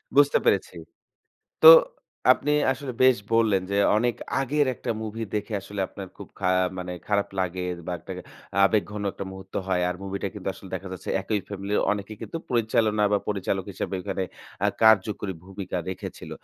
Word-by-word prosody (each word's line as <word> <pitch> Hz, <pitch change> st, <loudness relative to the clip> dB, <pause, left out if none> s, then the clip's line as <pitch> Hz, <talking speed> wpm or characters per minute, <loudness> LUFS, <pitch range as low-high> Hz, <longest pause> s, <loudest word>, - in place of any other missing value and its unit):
বুঝতে 145 Hz, 0 st, +6 dB
পেরেছি। -, -, +2 dB, 0.9 s
তো 475 Hz, -, +11 dB, 0.6 s
আপনি 150 Hz, -, -1 dB, 0.2 s
আসলে 135 Hz, -1 st, -6 dB
বেশ 130 Hz, -1 st, +6 dB, 0.2 s
বললেন, 105 Hz, -5 st, +3 dB
যে 100 Hz, -, 0 dB, 0.2 s
অনেক 120 Hz, +1 st, +1 dB, 0.3 s
আগের 145 Hz, +2 st, +1 dB
একটা 120 Hz, -, -5 dB
মুভি 110 Hz, +1 st, -5 dB
দেখে 105 Hz, +1 st, -2 dB
আসলে 100 Hz, +1 st, -6 dB
আপনার 95 Hz, -2 st, -8 dB
খুব -, -, -10 dB
খা 90 Hz, -, +1 dB, 0.3 s
মানে 90 Hz, 0 st, -4 dB, 0.2 s
খারাপ 100 Hz, -1 st, +1 dB
লাগে 90 Hz, -1 st, -1 dB
বা 90 Hz, -, -2 dB
একটা -, -, -8 dB, 0.5 s
আবেগঘন 105 Hz, 0 st, +1 dB
একটা 100 Hz, -, -6 dB
মুহূর্ত 95 Hz, 0 st, -12 dB
হয়। 90 Hz, -1 st, +1 dB
আর 90 Hz, -, -2 dB
মুভিটা 100 Hz, 0 st, -3 dB
কিন্তু 100 Hz, -1 st, -5 dB
আসলে 95 Hz, -1 st, -12 dB
দেখা 95 Hz, +1 st, -5 dB
যাচ্ছে 95 Hz, -, -6 dB
একই 105 Hz, +1 st, -1 dB
ফ্যামিলির 100 Hz, +1 st, -1 dB
অনেকেই 105 Hz, +1 st, -5 dB
কিন্তু 165 Hz, -, -5 dB
পরিচালনা 110 Hz, -3 st, +2 dB
বা 100 Hz, -, +4 dB
পরিচালক 95 Hz, -2 st, -1 dB
হিসাবে 95 Hz, -, -4 dB
ওইখানে 95 Hz, 0 st, -2 dB, 0.4 s
আ -, -, +3 dB
কার্যকরী 105 Hz, -2 st, +4 dB
ভূমিকা 95 Hz, -1 st, -6 dB
রেখেছিল। 95 Hz, -, -7 dB
100 Hz, 165 wpm, -25 LUFS, 95-110 Hz, 0.9 s, তো